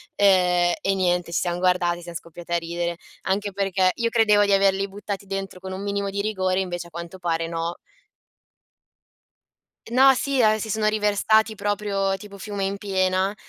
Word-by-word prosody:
ehm, 180 -3 +4
e 195 - 0
niente, 180 -2 0
ci 170 - +1
siamo 175 -1 -1
guardate, 180 -1 +1
siam 170 0 -9
scoppiati 170 +1 -9
a 170 - +3
ridere. 170 0 -3 0.3
Anche 200 +2 -1
perché 190 -1 +1
io 235 -1 0
credevo 215 -3 +4
di 200 - 0
averli 195 0 +3
buttati 200 0 -6
dentro 195 -1 -5
con 190 0 -7
un 190 - -5
minimo 200 0 -2
di 200 +1 -2
rigore, 190 -3 0
invece 175 -2 -3
a - - -15
quanto 170 +2 -8
pare 165 -2 -1
no. 165 +1 -3 2.1
No, 265 +2 +7
sì, 270 0 0
ah, 215 -1 +4
si 220 - -5
sono 215 +1 0
riversati 215 +1 +2
proprio 200 -1 -1
tipo 200 +1 -11
fiume 200 0 -4
in 195 +1 -2
piena, 190 0 0
195 Hz, 175 wpm, -24 LUFS, 175-205 Hz, 2.1 s, No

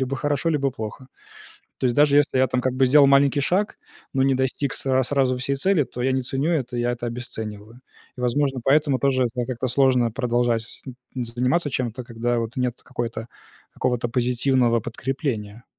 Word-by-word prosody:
Либо 130 +1 -1
хорошо, 145 +3 -1
либо 140 -4 +1
плохо. 120 +2 -7 0.7
То 130 - +1
есть 120 - 0
даже 145 -1 +5
если 145 -2 +3
я 130 - +4
там, 125 0 -1
как 130 0 -1
бы, 130 0 +3
сделал 140 +2 +6
маленький 140 +1 +4
шаг, 185 +9 0 0.3
но 135 -1 +1
не 135 0 +3
достиг 130 +1 -1
сра 130 -1 +1
сразу 130 -1 +1
всей 135 +2 -1
цели, 170 0 +2
то 125 0 -7
я 130 +1 +1
не 130 - +1
ценю 135 +5 -1
это, 125 -6 -2
я 120 0 0
это 120 0 -5
обесцениваю. 110 -1 -7 0.4
И, - - -8
возможно, 135 +1 0
поэтому 140 -1 +3
тоже, 130 -2 +2
да, 125 - -1
как-то 130 0 -3
сложно 125 -2 +3
продолжать 120 -2 0
сз 115 - -13 0.5
заниматься 130 +6 +1
чем-то, 125 -1 -3
когда 120 0 -2
вот 115 +1 -4
нет 125 -1 -2
какой-то 120 -3 -5 0.4
какого-то 125 -1 -1
позитивного 125 0 +1
подкрепления. 120 -2 -4
130 Hz, 180 wpm, -23 LUFS, 120-135 Hz, 0.7 s, сделал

